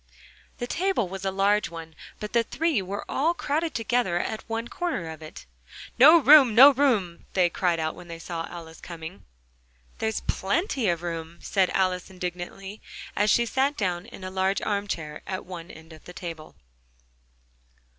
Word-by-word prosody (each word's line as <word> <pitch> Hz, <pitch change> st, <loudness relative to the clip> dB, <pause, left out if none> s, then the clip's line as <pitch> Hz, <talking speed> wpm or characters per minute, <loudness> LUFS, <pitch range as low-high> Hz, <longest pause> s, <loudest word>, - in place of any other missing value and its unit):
The 245 Hz, -, -3 dB
table 360 Hz, -, 0 dB
was 195 Hz, +1 st, -7 dB
a -, -, +2 dB
large 200 Hz, +2 st, +2 dB
one, 165 Hz, -1 st, -9 dB, 0.3 s
but 210 Hz, 0 st, -6 dB
the 235 Hz, -, +4 dB
three 305 Hz, 0 st, 0 dB
were 195 Hz, +2 st, -5 dB
all 325 Hz, +5 st, +1 dB
crowded 310 Hz, +1 st, -1 dB
together 225 Hz, -5 st, +1 dB
at 215 Hz, +5 st, -3 dB
one 225 Hz, +1 st, -2 dB
corner 285 Hz, -, -3 dB
of 160 Hz, 0 st, -10 dB
it: 155 Hz, -, -10 dB, 0.5 s
"No 310 Hz, +7 st, +9 dB
room! 280 Hz, -6 st, +7 dB
No 270 Hz, +5 st, +10 dB
room!" 225 Hz, -11 st, 0 dB
they 180 Hz, -2 st, +3 dB
cried 175 Hz, -2 st, 0 dB
out 160 Hz, 0 st, -1 dB
when 175 Hz, -, -12 dB
they 165 Hz, -1 st, -7 dB
saw 165 Hz, 0 st, -5 dB
Alice 165 Hz, -2 st, -10 dB
coming. 170 Hz, +1 st, -9 dB, 0.7 s
"There's 220 Hz, 0 st, -1 dB
plenty 260 Hz, -, 0 dB
of 170 Hz, 0 st, -1 dB
room!" 165 Hz, -1 st, -5 dB
said 190 Hz, -2 st, +1 dB
Alice, 185 Hz, -1 st, 0 dB
indignantly, 185 Hz, +2 st, -6 dB, 0.3 s
and 210 Hz, +1 st, +2 dB
she 235 Hz, -, +4 dB
sat 270 Hz, +4 st, 0 dB
down 180 Hz, -4 st, -2 dB
in 190 Hz, -, -11 dB
a 185 Hz, -, -5 dB
large 190 Hz, +1 st, +1 dB
arm 205 Hz, -1 st, -1 dB
chair 150 Hz, -5 st, -5 dB
at 185 Hz, -1 st, -4 dB
one 175 Hz, -1 st, -8 dB
end 160 Hz, +1 st, -13 dB
of 155 Hz, -, -15 dB
the 180 Hz, -, -10 dB
table. 165 Hz, -3 st, -8 dB
190 Hz, 175 wpm, -26 LUFS, 170-235 Hz, 0.7 s, No